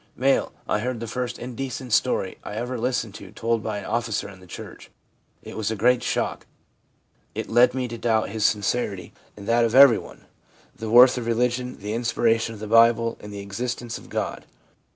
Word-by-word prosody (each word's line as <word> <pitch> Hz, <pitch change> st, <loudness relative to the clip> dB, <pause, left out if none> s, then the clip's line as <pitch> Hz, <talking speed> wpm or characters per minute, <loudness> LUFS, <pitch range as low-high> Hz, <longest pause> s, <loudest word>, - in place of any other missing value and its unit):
M. 135 Hz, +2 st, +3 dB, 0.2 s
'I 105 Hz, -, +1 dB
heard 125 Hz, +1 st, -3 dB
the 115 Hz, -, -4 dB
first 125 Hz, +1 st, -4 dB
indecent 125 Hz, 0 st, -5 dB
story 100 Hz, -7 st, +1 dB
I 105 Hz, -, -7 dB
ever 120 Hz, +2 st, -3 dB
listened 115 Hz, -3 st, -1 dB
to -, -, -11 dB
told 115 Hz, -1 st, -1 dB
by 105 Hz, -1 st, -3 dB
an 100 Hz, -, -7 dB
officer 115 Hz, -2 st, -2 dB
in 95 Hz, -2 st, -12 dB
the 90 Hz, -, -16 dB
church. -, -, -10 dB, 0.5 s
It -, -, -9 dB
was 110 Hz, -1 st, -2 dB
a 110 Hz, -, -2 dB
great 125 Hz, +3 st, +3 dB
shock. -, -, -2 dB, 0.9 s
It -, -, -4 dB
led 120 Hz, +2 st, +5 dB
me 130 Hz, -1 st, -1 dB
to 120 Hz, -1 st, -7 dB
doubt 110 Hz, -2 st, +1 dB
his 110 Hz, +1 st, -3 dB
sincerity, 105 Hz, -2 st, 0 dB, 0.2 s
and 100 Hz, 0 st, -10 dB
that 120 Hz, +1 st, +3 dB
of 115 Hz, 0 st, +1 dB
everyone, 135 Hz, -4 st, +5 dB, 0.5 s
the 110 Hz, -, -6 dB
worth 125 Hz, +2 st, +7 dB
of 115 Hz, -, -5 dB
re 115 Hz, -, +2 dB
ligion, 125 Hz, +1 st, -1 dB
the 105 Hz, +2 st, -5 dB
inspiration 115 Hz, -1 st, +1 dB
of -, -, -12 dB
the 110 Hz, -, -6 dB
Bible, 115 Hz, +1 st, +4 dB
and 105 Hz, -, -10 dB
the 100 Hz, 0 st, -6 dB
existence 120 Hz, +4 st, -4 dB
of -, -, -16 dB
God. -, -, -4 dB
115 Hz, 195 wpm, -24 LUFS, 110-125 Hz, 0.9 s, worth